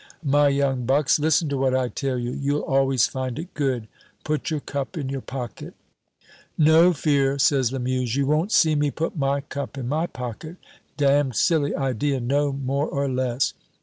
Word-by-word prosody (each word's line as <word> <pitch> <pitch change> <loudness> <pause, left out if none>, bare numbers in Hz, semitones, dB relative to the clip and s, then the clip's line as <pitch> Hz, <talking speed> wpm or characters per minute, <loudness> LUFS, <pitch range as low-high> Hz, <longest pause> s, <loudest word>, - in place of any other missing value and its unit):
My 145 +1 +4
young 135 -3 0
bucks, 140 +2 +3
listen 155 +1 +2
to 140 - -1
what 130 -1 +2
I 130 -1 +1
tell 135 +1 -3
you; 120 0 -3
you'll 140 +3 -1
always 135 -3 +2
find 130 -1 -4
it 170 +4 -7
good 130 -6 -1 0.4
put 155 0 -2
your 155 -2 -1
cup 140 +4 -5
in 140 -4 -3
your 135 -1 -4
pocket." 125 -3 -7 0.8
"No 160 +3 +6
fear," 140 -3 +1
says 135 -3 +2
Lamuse, 130 -2 -1
"you 140 0 +1
won't 155 +8 +1
see 160 -7 +4
me 145 -1 +1
put 160 +5 -3
my 140 -2 0
cup 140 0 -6
in 125 -3 -4
my 155 +6 0
pocket; 125 +6 -7 0.4
damned 140 -3 +2
silly 150 0 +2
idea, 135 +1 -1
no 140 +4 0
more 140 +2 -2
or 140 0 -1
less. 130 -1 0
140 Hz, 180 wpm, -23 LUFS, 130-145 Hz, 0.8 s, No